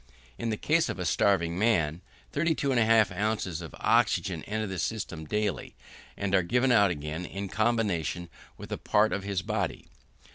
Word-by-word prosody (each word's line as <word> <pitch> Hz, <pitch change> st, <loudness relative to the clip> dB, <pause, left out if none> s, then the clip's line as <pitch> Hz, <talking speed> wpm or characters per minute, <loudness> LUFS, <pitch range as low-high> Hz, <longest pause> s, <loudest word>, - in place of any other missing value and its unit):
In 115 Hz, -, -2 dB
the 110 Hz, -, -1 dB
case 160 Hz, +7 st, +2 dB
of -, -, -3 dB
a 90 Hz, -, -3 dB
starving 85 Hz, -1 st, +2 dB
man, 90 Hz, -7 st, +2 dB, 0.3 s
32 155 Hz, -2 st, 0 dB
1/2 115 Hz, -4 st, +4 dB, 0.3 s
oz. 85 Hz, -3 st, -5 dB
of 80 Hz, -, -9 dB
oxygen -, -, +2 dB
enter 110 Hz, +1 st, -2 dB
the 95 Hz, -3 st, -4 dB
system 85 Hz, -5 st, -3 dB
daily, 105 Hz, -2 st, -2 dB, 0.4 s
and 100 Hz, -1 st, -2 dB
are 95 Hz, -, +5 dB
given 125 Hz, +8 st, +2 dB
out 105 Hz, -4 st, +5 dB
again 75 Hz, +1 st, -4 dB
in 100 Hz, +2 st, -5 dB
combination 100 Hz, -7 st, 0 dB, 0.3 s
with -, -, -10 dB
a -, -, -3 dB
part 105 Hz, +1 st, +2 dB
of 100 Hz, -, -1 dB
his 100 Hz, -2 st, -2 dB
body. -, -, -2 dB
100 Hz, 170 wpm, -28 LUFS, 85-110 Hz, 0.4 s, are